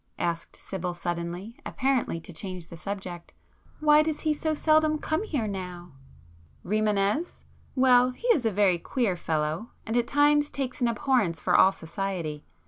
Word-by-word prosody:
asked 170 -1 -3
Sibyl 180 -2 -5
suddenly, 175 +5 -4
apparently 260 -10 0
to 170 +2 -11
change 185 0 -5
the - - -9
subject—"Why 200 - -1
does 310 -1 -2
he 310 -1 +2
so 310 +1 -1
seldom 310 0 +3
come 315 +3 -1
here 295 - -2
now?" 180 -3 -6 0.7
"Rimânez? 210 - 0 0.3
Well, 250 -1 +5
he 255 - -10
is 435 - +4
a 225 - +1
very 195 -3 +3
queer 225 -1 0
fellow, 160 +6 -2 0.2
and 225 - -2
at 240 -1 +2
times 290 0 +3
takes 260 -2 -4
an 240 - +3
abhorrence 230 - +1
for - - +1
all 190 - +7
society. 165 -4 -4
210 Hz, 150 wpm, -27 LUFS, 175-275 Hz, 0.7 s, all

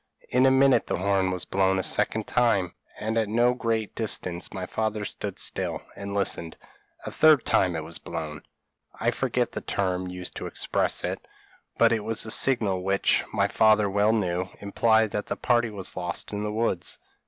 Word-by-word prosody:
In 130 +1 +4
a - - +6
minute 130 0 +4
the - - -1
horn 95 0 +1
was 90 -1 -2
blown 95 0 +1
a 95 - -1
second 110 +2 0
time, 100 -8 +1 0.2
and 110 +1 -1
at 110 -2 -1
no 120 +3 +3
great 115 -4 -2
distance; 90 -5 -2
my 95 -2 -5
father 110 +1 -2
stood 100 -2 -5
still, - - -2
and 100 0 -6
listened: 85 -4 -1 0.5
a - - -4
third 155 -5 +5
time 90 -3 +2
it 80 - -3
was 85 +1 +2
blown. 75 -1 -6 0.6
I - - +1
forget - - -1
the - - -5
term 95 -2 -2
used 90 0 -5
to - - -5
express - - 0
it, - - -4 0.5
but 115 0 +5
it 110 -2 0
was 110 +1 0
the 110 - -3
signal 110 -9 +2
which, 95 +1 +2
my - - +1
father 110 -1 +4
well 100 +2 +2
knew, 90 -4 -1
implied 110 +1 +2
that 105 - -3
the - - -2
party 120 -2 +2
was 100 -3 -3
lost 90 +2 -4
in 105 - -3
the 105 0 -2
woods. 110 -5 -1
105 Hz, 190 wpm, -26 LUFS, 95-110 Hz, 0.6 s, a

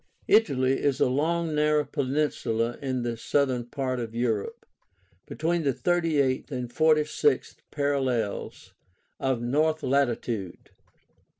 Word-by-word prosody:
Italy 135 -12 +3
is 140 -2 +1
a - - +4
long, 160 +5 0
narrow 150 0 +2
peninsula 130 -5 -1
in 130 -3 -2
the 120 -1 -2
southern 125 0 0
part 130 0 -3
of 115 -1 -5
Europe, 115 -4 -2 0.6
between 170 +2 -1
the 140 -5 0
38th 155 -8 +1
and 125 -3 -5
46th 155 - +2
parallels 130 -7 -2 0.5
of 130 -3 -1
north 155 +5 +1
latitude. 120 -7 -1
135 Hz, 110 wpm, -26 LUFS, 120-150 Hz, 0.6 s, a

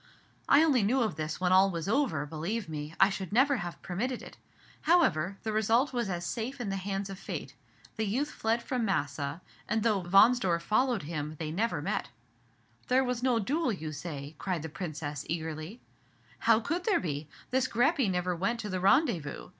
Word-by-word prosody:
I 300 - +7
only 280 -7 +4
knew 240 +6 +2
of 210 -8 -1
this 155 0 -4
when 180 0 +1
all 190 +1 +6
was 170 -2 -4
over; 215 - +1
believe 165 +8 -3
me, 155 0 -6
I 195 +1 +6
should 190 -2 -5
never 265 +5 +4
have 175 -4 -5
permitted 235 +8 -3
it. - - -11 0.5
However, 195 - +3
the 220 - -1
result 225 +6 +2
was 240 -4 -1
as 175 -1 -3
safe 250 +7 -3
in 230 -5 -3
the 195 - -1
hands 195 +1 -3
of 190 - -8
Fate. - - -6 0.4
The 220 -1 0
youth 275 +9 -1
fled 225 +2 0
from 250 -3 -1
Massa; 145 -5 -1 0.3
and 220 -1 +1
though 215 -4 +2
Wahnsdorf 190 -1 +4
followed 235 - +1
him, 150 0 -4
they 155 0 -4
never 220 +8 -1
met." - - -2 0.8
"There 255 +1 +4
was 250 -2 -2
no 250 -2 +2
duel, 270 +7 0
you 160 -6 -4
say?" 145 -1 -6
cried 180 -5 -2
the 160 - -5
Princess, 150 -3 -5
eagerly. 160 +6 -4 0.6
"How 225 -1 +4
could 335 +10 -2
there 430 - +3
be? 150 -3 -4 0.2
This 260 0 +2
Greppi 260 - +2
never 180 -1 0
went 195 +8 -1
to 210 - -5
the 185 -1 -2
rendezvous. 195 - +2
195 Hz, 190 wpm, -30 LUFS, 165-245 Hz, 0.8 s, I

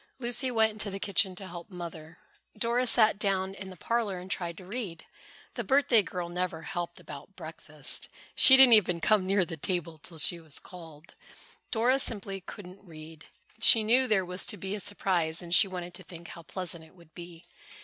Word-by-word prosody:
Lucy 255 +1 0
went 220 -2 +2
into 215 -1 -3
the 195 - -5
kitchen 195 -1 +1
to 195 - -7
help 175 0 -10
Mother. 170 -3 -9 0.4
Dora 240 +2 0
sat 220 -3 +4
down 190 -2 -1
in 195 -1 -9
the 185 - -12
parlor 230 -4 -2
and 180 +1 -10
tried 170 -2 -4
to 185 - -12
read. 195 -5 -6 0.5
The - - -4
birthday 270 -4 +3
girl 180 -3 -6
never 175 -2 -4
helped 175 -1 -5
about 150 +6 -12
breakfast. 155 -4 -3 0.2
She 265 - +9
didn't 265 -3 +8
even 180 -5 +3
come 190 +2 +2
near 195 -1 +2
the 165 -2 -8
table 165 0 -3
till 165 +3 -11
she 170 +3 +3
was 160 -3 -6
called. 165 -3 -13 0.6
Dora 250 +4 +2
simply 195 -6 -2
couldn't 185 0 -12
read. 160 -3 -13 0.3
She 225 0 +6
knew 250 +4 +3
there 205 -5 +1
was 180 +1 -3
to 205 - -2
be 195 0 -5
a 210 - -4
surprise 175 -5 -1
and 170 0 -6
she 195 - +6
wanted 180 -2 -7
to 180 - -7
think 170 0 -12
how 170 - -10
pleasant 170 -1 -6
it 160 - -19
would 170 -3 -21
be. 170 -1 -12
185 Hz, 195 wpm, -28 LUFS, 170-210 Hz, 0.6 s, She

